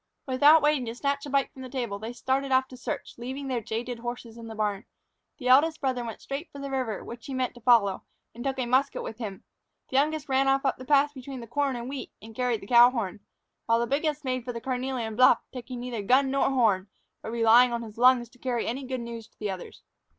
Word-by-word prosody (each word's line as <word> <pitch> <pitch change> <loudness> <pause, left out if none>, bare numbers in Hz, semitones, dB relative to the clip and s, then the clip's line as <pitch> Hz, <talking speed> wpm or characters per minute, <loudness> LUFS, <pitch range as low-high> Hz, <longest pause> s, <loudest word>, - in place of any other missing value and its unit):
Without 290 +4 +6
waiting 295 -5 +2
to 230 - -4
snatch 280 +2 -2
a - - -7
bite 275 0 +1
from 260 - -11
the 255 - -7
table, 240 -6 -3
they 220 +2 -5
started 265 +3 -1
off 260 0 +3
to 255 - -10
search, 240 -1 -6
leaving 265 +3 -5
their 250 -3 -1
jaded 230 +3 -4
horses 240 -1 -6
in 230 -1 -9
the 225 - -8
barn. 210 -2 -1 0.5
The 250 - -5
eldest 305 +5 +5
brother 260 -3 -1
went 230 -2 -7
straight 285 +4 -5
for - - -11
the 280 0 -6
river, 255 -6 -2
which 235 0 -9
he 270 - -4
meant 255 -1 -1
to 240 - -15
follow, 225 -5 +3 0.3
and 240 - -8
took 270 -1 -2
a 255 - -1
musket 260 +3 +1
with 225 - -7
him; 205 -5 -6 0.5
the 260 - 0
youngest 300 +1 +1
ran 270 0 +2
off 270 +1 +2
up 270 - +1
the 255 - -10
path 290 +1 +3
between 265 -1 -8
the 235 - -8
corn 275 +3 -1
and 240 0 -5
the - - -6
wheat, 275 -1 -6
and 225 +1 -12
carried 245 -2 -1
the - - -9
cow 240 +1 +8
horn; 220 -6 -3 0.5
while 230 0 +3
the 235 - +1
biggest 300 +2 -1
made 255 -1 -1
for 245 - -4
the 230 - -4
carnelian 250 -3 -3
bluff, 250 0 +6
taking 250 -1 -7
neither 240 -3 -4
gun 265 +6 +3
nor 275 0 +2
horn, 220 -8 +2 0.3
but - - -6
relying 235 +2 +5
on 235 0 -2
his 220 0 -10
lungs 250 -1 +5
to 245 - -23
carry 245 -2 -1
any 260 +4 -3
good 255 -1 -3
news 230 -1 -7
to - - -37
the 210 -2 -3
others. 185 -2 -9
250 Hz, 250 wpm, -27 LUFS, 230-270 Hz, 0.5 s, cow